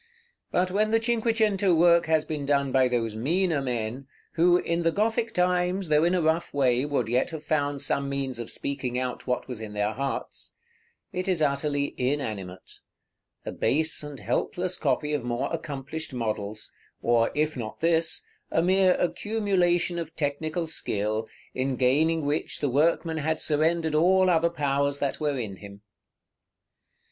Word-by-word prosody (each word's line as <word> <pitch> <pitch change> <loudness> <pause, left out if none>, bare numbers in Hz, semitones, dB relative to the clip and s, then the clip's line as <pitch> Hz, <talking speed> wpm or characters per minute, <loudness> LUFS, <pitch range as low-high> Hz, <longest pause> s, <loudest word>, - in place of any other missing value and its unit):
But 180 +1 +1
when 210 +3 +2
the 225 +1 +3
cinque 230 -1 0
cento 200 -4 +3
work 170 0 +5
has 160 -1 +2
been 150 -2 -4
done 140 -1 +1
by 130 -1 +4
those 115 -3 -1
meaner 160 +6 +1
men, 125 0 -3 0.2
who, 175 +1 +4
in 170 -1 -1
the 165 0 +2
Gothic 225 +4 0
times, 180 -1 +1
though 150 0 +4
in 175 +2 +3
a 175 - +1
rough 160 +2 +1
way, 130 -1 +2
would 140 -6 -1
yet 125 +6 +1
have 160 -3 -7
found 145 -2 -1
some 140 0 0
means 135 -3 -3
of 120 - -5
speaking 130 -3 -3
out 125 0 -4
what 125 - -1
was 125 -4 -6
in 105 -1 -7
their 105 +1 0
hearts, 135 +2 -4 0.6
it 185 +1 -3
is 185 -3 +1
utterly 145 0 0
inanimate, 110 -9 -3 0.7
a - - -3
base 160 +3 0
and 145 -3 -8
helpless 180 0 -2
copy 150 +1 0
of 145 -4 -1
more 120 +5 -2
accomplished 155 -2 -5
models; 110 -2 -4 0.3
or, 115 -1 +3
if 155 +1 0
not 110 -4 -6
this, 165 0 +2 0.2
a 165 - +1
mere 185 0 +4
accumulation 180 -4 +1
of 165 -1 -6
technical 155 +3 -2
skill, 110 -7 -2 0.3
in 130 +1 -1
gaining 150 +5 +2
which 145 +2 -2
the 145 - 0
workman 160 +4 +1
had 155 +1 -1
surrendered 160 +1 +1
all 185 +4 +4
other 170 0 +3
powers 140 -3 0
that 140 -1 -2
were 150 -3 0
in 105 -6 -4
him. 100 +1 -12
150 Hz, 165 wpm, -26 LUFS, 130-170 Hz, 0.7 s, work